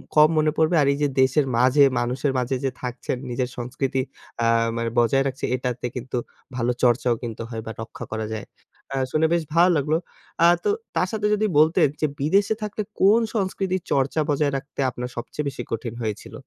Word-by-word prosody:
কম 150 0 +7
মনে 155 0 +3
পড়বে 160 +2 +3
আর 140 - +3
এই - - -4
যে - - +4
দেশের 135 +3 +3
মাঝে 130 +4 +5 0.2
মানুষের 125 +3 0
মাঝে 125 +1 -1
যে 130 - +1
থাকছেন 125 0 -3
নিজের 125 +1 -1
সংস্কৃতি 130 +2 -2 0.4
আ - - +2 0.3
মানে 115 0 -1
বজায় 135 +3 +3
রাখছে, 135 0 -3
এটাতে 125 -1 -3
কিন্তু 125 0 -4 0.4
ভালো 125 0 +1
চর্চাও 120 -1 +3
কিন্তু 115 -2 -5
হয় 115 -2 -5
বা 110 - -5
রক্ষা 115 - -8
করা 110 -1 -3
যায়। 110 - -7 0.5
আ - - -2 0.2
শুনে 155 +1 +2
বেশ 170 -1 +1
ভালো 175 +2 +6
লাগলো। 150 +3 +1 0.5
আ - - +8 0.2
তো - - +1 0.3
তার - - +2
সাথে 215 -2 0
যদি 210 +1 +1
বলতেন, 155 -1 +5
যে 155 - +3
বিদেশে 200 +9 +2
থাকলে 210 0 -3 0.2
কোন 210 +4 +6
সংস্কৃতির 190 -2 -1
চর্চা 140 +3 +1
বজায় 145 0 +2
রাখতে 135 +1 -11
আপনার 125 0 -5
সবচেয়ে 140 +5 -4
বেশি 130 - -6
কঠিন 115 0 -3
হয়েছিল? 110 -1 -4
135 Hz, 190 wpm, -23 LUFS, 120-155 Hz, 0.5 s, আ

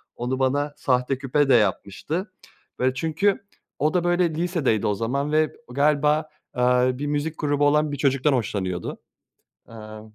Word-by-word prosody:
onu 125 +2 -3
bana 145 +2 0
sahte 125 0 0
küpe 140 +1 0
de - - +6
yapmıştı. 115 - -1 0.5
Böyle, 130 +1 +2
çünkü 165 +8 0 0.3
o 150 +2 +1
da, 180 -1 +1
böyle, 175 0 +2
lisedeydi 165 - 0
o 105 - +1
zaman 140 +7 -2
ve 155 0 +2 0.2
galiba, 150 +2 +2 0.2
aaa, 125 0 +2
bir 145 +1 -3
müzik 150 +2 -2
grubu 145 -1 +1
olan 150 0 +2
bir 145 - -4
çocuktan 140 +1 +2
hoşlanıyordu. 95 -7 -3 0.7
Aaa, 110 -1 -10
140 Hz, 150 wpm, -24 LUFS, 125-150 Hz, 0.7 s, de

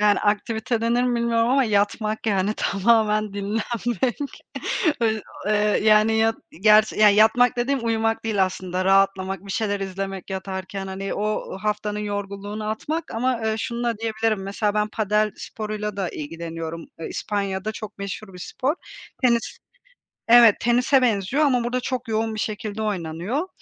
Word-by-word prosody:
Yani, 210 -1 +4
aktivite 220 +3 0
denir 235 +2 +2
mi 250 -1 +1
bilmiyorum 230 0 +2
ama 270 +1 +4
yatmak, 215 +1 0
yani, 200 0 +1
tamamen 215 0 +2
dinlenmek. 230 +5 -2 0.6
Ö 220 -2 +1 0.3
eee, 215 - +2 0.3
yani, 215 +1 +5
yat 225 0 +2 0.3
gerçi 215 0 +5
ya 210 -1 +8
yatmak 225 +4 +4
dediğim 250 +1 0
uyumak 225 -1 0
değil 205 -4 +2
aslında 185 0 -3
rahatlamak, 195 0 +2
bir 195 - -4
şeyler 205 -2 -1
izlemek 195 0 -5
yatarken 190 0 -5
hani 195 +1 -4
o 210 -2 -2
haftanın 210 0 -1
yorgunluğunu 205 +1 -4
atmak 310 +9 -3
ama, 245 +1 0
eee, 220 0 0
şununla 235 -1 -2
diyebilirim. 220 -2 -1
Mesela 205 +1 -1
ben 210 0 +1
padel 215 0 +1
sporuyla 210 -1 -5
da 195 -3 -1
ilgileniyorum. 165 +1 -6 0.2
İspanya'da 200 0 -2
çok 215 -2 -8
meşhur 200 0 -6
bir - - -10
spor. 265 - -2 0.5
Tenis 235 -2 +1 0.7
evet 235 -2 +7
tenise 250 +3 +3
benziyor 235 +5 +2
ama 250 -4 +2
burada 245 +1 -1
çok 250 -1 -4
yoğun 220 0 -1
bir 215 - -3
şekilde 215 0 -4
oynanıyor. 200 - -2
215 Hz, 145 wpm, -23 LUFS, 195-230 Hz, 0.7 s, ya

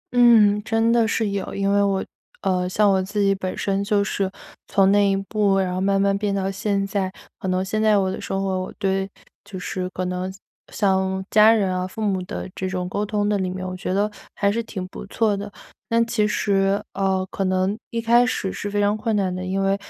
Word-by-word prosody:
嗯， 215 -4 +6
真 225 +1 +2
的 230 -1 +3
是 220 -2 0
有。 200 -2 -4
因 200 0 0
为 200 0 +3
我 195 -1 +1 0.4
呃， 180 -2 0
像 205 +2 +3
我 190 -1 +2
自 200 +3 -4
己 200 -1 +3
本 185 -1 -4
身 195 0 0
就 200 0 +2
是 195 -2 -2 0.4
从 195 -1 +3
那 205 0 +4
一 195 - +2
步， 200 0 +1
然 185 -2 0
后 185 - -2
慢 195 0 +2
慢 200 0 +2
变 200 0 -1
到 195 0 -1
现 195 0 -1
在， 195 -1 -2 0.3
可 - - -5
能 185 0 0
现 215 +3 -1
在 215 -1 +4
我 190 -1 +1
的 - - -5
生 195 - -2
活 190 -1 -1
我 185 - -6
对 195 0 -1 0.3
就 200 -1 -9
是 180 0 -4
可 185 0 -4
能 180 +1 -3 0.4
像 190 -1 0
家 215 +1 +7
人 195 -5 +1
啊、 185 0 -2
父 205 - -11
母 200 -3 0
的 - - -5
这 185 - -3
种 180 -1 -3
沟 200 +3 -2
通 210 0 -1
的 205 -1 +1
里 185 -1 -1
面， 185 0 -5
我 185 - -5
觉 185 - -4
得 200 +3 +1 0.3
还 200 0 +2
是 230 +3 -1
挺 190 -5 -6
不 - - -8
错 215 0 +1
的。 205 +1 -6 0.4
但 230 0 +3
其 215 -2 +1
实， 195 -1 +1
呃， 190 -1 0
可 195 - -2
能 185 +2 +1
一 230 - -3
开 235 +2 +4
始 200 -6 -1
是 205 - -4
非 205 0 -1
常 205 +1 +2
困 215 0 -1
难 190 -3 0
的， 185 - -4
因 190 +1 -1
为 195 0 +2
195 Hz, 250 characters per minute, -22 LUFS, 190-210 Hz, 0.4 s, 家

